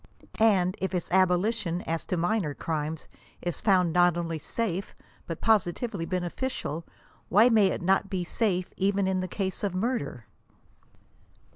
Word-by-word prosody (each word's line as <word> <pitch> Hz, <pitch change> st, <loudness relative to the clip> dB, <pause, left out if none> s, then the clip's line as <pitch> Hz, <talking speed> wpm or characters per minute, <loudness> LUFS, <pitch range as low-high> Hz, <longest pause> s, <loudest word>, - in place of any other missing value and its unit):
And 190 Hz, -5 st, +4 dB
if 190 Hz, 0 st, -1 dB
its 175 Hz, -, -2 dB
aboli 185 Hz, +3 st, +3 dB
tion, 180 Hz, -6 st, -3 dB
as 165 Hz, 0 st, -3 dB
to 180 Hz, -, -1 dB
minor 175 Hz, -3 st, 0 dB
crimes, 155 Hz, -1 st, -3 dB, 0.3 s
is 175 Hz, -2 st, -4 dB
found 180 Hz, -5 st, +3 dB
not 175 Hz, -1 st, +4 dB
only 165 Hz, -2 st, -3 dB
safe 195 Hz, +2 st, -3 dB, 0.3 s
but 165 Hz, -, -5 dB
positively 205 Hz, -2 st, +1 dB
bene* 180 Hz, -1 st, -1 dB
ficial, 170 Hz, -, -4 dB, 0.4 s
why 215 Hz, +6 st, +6 dB
may 215 Hz, -4 st, +5 dB
it 185 Hz, -, -2 dB
not 195 Hz, +2 st, +2 dB
be 185 Hz, -3 st, -2 dB
safe 185 Hz, -1 st, -1 dB
even 195 Hz, 0 st, +1 dB
in 190 Hz, 0 st, +1 dB
the 185 Hz, -, -2 dB
case 190 Hz, +1 st, -3 dB
of 195 Hz, -3 st, -1 dB
murder 185 Hz, -, -2 dB
185 Hz, 155 wpm, -27 LUFS, 170-200 Hz, 0.4 s, why